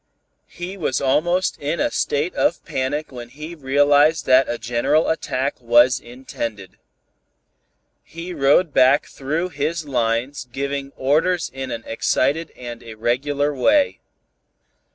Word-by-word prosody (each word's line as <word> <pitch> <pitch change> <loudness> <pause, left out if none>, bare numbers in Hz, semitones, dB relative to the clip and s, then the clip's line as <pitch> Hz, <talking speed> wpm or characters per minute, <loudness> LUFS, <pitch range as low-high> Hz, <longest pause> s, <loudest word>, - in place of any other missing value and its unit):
He 180 +3 -7
was 145 -8 -1
almost 165 +7 +1
in 150 +3 -2
a - - +1
state 150 +5 -1
of 170 - 0
panic 145 +4 -3
when 120 -2 -9
he 150 +6 -9
realized 145 +1 +3
that 130 +1 +4
a 120 - -2
general 120 +7 +1
attack 135 -4 -2
was 120 +1 +4
intended. 115 -6 -7 1.2
He 170 +2 -8
rode 145 +2 +3
back 130 +3 +4
through 155 +6 -3
his 155 +1 -3
lines 125 +1 -1
giving 140 +1 -3
orders 160 +5 +1
in 135 0 -5
an 115 -2 -5
excited 140 +7 0
and 120 -2 -8
irregular 135 +6 -1
way. 285 - +2
140 Hz, 125 wpm, -21 LUFS, 125-155 Hz, 1.2 s, that